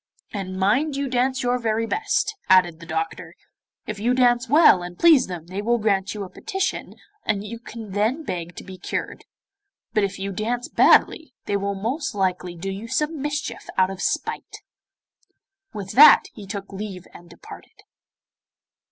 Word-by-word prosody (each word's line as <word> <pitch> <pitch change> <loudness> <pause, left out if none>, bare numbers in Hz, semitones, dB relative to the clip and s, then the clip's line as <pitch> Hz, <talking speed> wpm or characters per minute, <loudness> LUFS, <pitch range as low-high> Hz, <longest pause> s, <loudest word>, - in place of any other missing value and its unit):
'And 185 -2 -5
mind 255 +11 +1
you 280 0 -2
dance 260 +1 0
your 245 0 +1
very 225 -1 0
best,' 430 - -1
added 180 -3 +4
the 165 - -12
doctor. 160 0 -4 0.5
'If 215 -1 -5
you 240 +4 +1
dance 245 -1 +3
well 295 - +6
and 175 0 -8
please 320 -7 +5
them 175 -3 -7
they 185 +3 -5
will 240 +3 +1
grant 200 -2 0
you 205 - -4
a 190 - -8
petition 385 0 -3 0.3
and 210 -2 -1
you 230 +2 -7
can 225 -3 -9
then 220 +10 0
beg 175 - -5
to - - -9
be 190 -1 -11
cured; - - -5 0.7
but 215 -2 +2
if 200 0 -2
you 195 +1 -4
dance 235 +5 -2
badly 315 -6 +3
they 205 - -1
will 200 0 -1
most 255 +7 -3
likely 180 -2 -1
do 190 +3 -5
you 200 +4 -7
some 300 +4 -1
mischief 295 0 -4
out 185 0 +3
of 195 - -7
spite.' - - -3 1.1
With 195 -2 -6
that 300 +4 +8
he 205 -3 -11
took 200 0 -7
leave 195 -3 -7
and 175 0 -14
departed. 170 - -14
210 Hz, 170 wpm, -23 LUFS, 190-250 Hz, 1.1 s, that